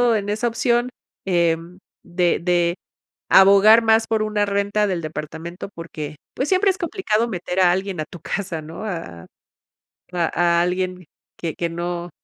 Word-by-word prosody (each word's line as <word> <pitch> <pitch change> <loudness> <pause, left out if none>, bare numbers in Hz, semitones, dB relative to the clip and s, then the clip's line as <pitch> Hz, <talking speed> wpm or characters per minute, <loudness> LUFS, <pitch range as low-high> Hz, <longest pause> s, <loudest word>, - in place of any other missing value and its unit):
en 205 -1 -2
esa 215 +3 0
opción, 240 +1 +1 0.4
em, 170 -1 0 0.2
de 175 -1 +1
de 175 -1 +1 0.6
abogar 200 +4 +7
más 225 0 +3
por 220 -1 +1
una 210 -1 0
renta 200 +1 0
del 180 -3 -2
departamento 160 +4 -6
porque 155 -3 -7 0.2
pues 265 - -2
siempre 385 +1 +3
es 380 - -3
complicado 330 - -1
meter 185 -2 -3
a 180 -1 +5
alguien 190 -2 -2
a - - -2
tu 175 - -12
casa, 170 -1 -4
¿no?, 165 +7 -8
a 165 - -6 0.9
a 170 -2 0 0.3
a - - +4
alguien 180 0 -2 0.3
que 165 -2 -4
que 170 -1 -2
no 175 +1 -4
180 Hz, 155 wpm, -21 LUFS, 170-215 Hz, 0.9 s, abogar